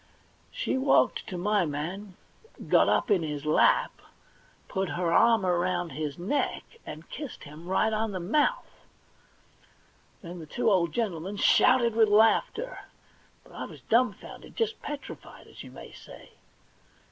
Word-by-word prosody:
She - - -2
walked 260 - +2
to 185 - -5
my 205 +2 +1
man, 175 +6 -5 0.5
got - - +4
up - - +1
in 195 -4 +4
his 150 -2 -5
lap, 155 - +2 0.7
put 190 -1 -2
her 170 -1 -1
arm 225 -1 +4
round 175 -1 0
his 150 0 -4
neck, 190 +12 -1 0.2
and 155 +2 -9
kissed 285 -1 -7
him 155 +4 -12
right 215 +4 +1
on 220 0 -1
the 185 - -4
mouth. 300 - -1 1.4
Then 175 0 -8
the 160 - -10
two 235 +6 0
old 170 -4 +2
gentlemen 195 -3 -3
shouted 240 +2 +4
with 220 -2 +4
laughter, 225 - +2 0.6
but - - -19
I - - -6
was - - -12
dumfounded, 230 -3 -1
just 450 -1 -1
petrified, 295 -1 -9
as - - -13
you - - -10
may - - -12
say. - - -14
195 Hz, 145 wpm, -27 LUFS, 170-230 Hz, 1.4 s, got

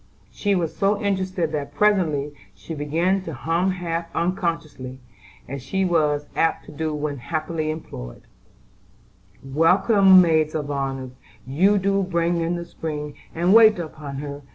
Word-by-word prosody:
She 205 -1 0
was 170 -4 -1
so 200 +1 +1
interested 185 -5 -1
that 145 -2 -4
presently 155 -7 +2 0.2
she 165 - -8
began 165 +6 0
to 165 -5 -7
hum 165 +8 0
half 170 -2 -3
unconsciously, 165 -7 -2 0.5
as 140 +1 -6
she 190 +9 -1
was 150 -4 +1
apt 165 - +1
to - - -11
do 155 +1 -3
when 150 -2 -3
happily 155 +3 -3
employed: 65 - -7 1.2
"Welcome, 185 - +5
maids 160 -3 +3
of 145 -2 -3
honor, 135 -2 -3 0.3
You 180 +11 +3
do 195 +1 +1
bring 170 -2 0
In 165 +1 -1
the 170 0 -5
spring, 150 -3 -5 0.2
And 175 +3 +3
wait 220 -2 +7
upon 155 -4 -7
her. 145 +1 -6
165 Hz, 145 wpm, -23 LUFS, 145-185 Hz, 1.2 s, wait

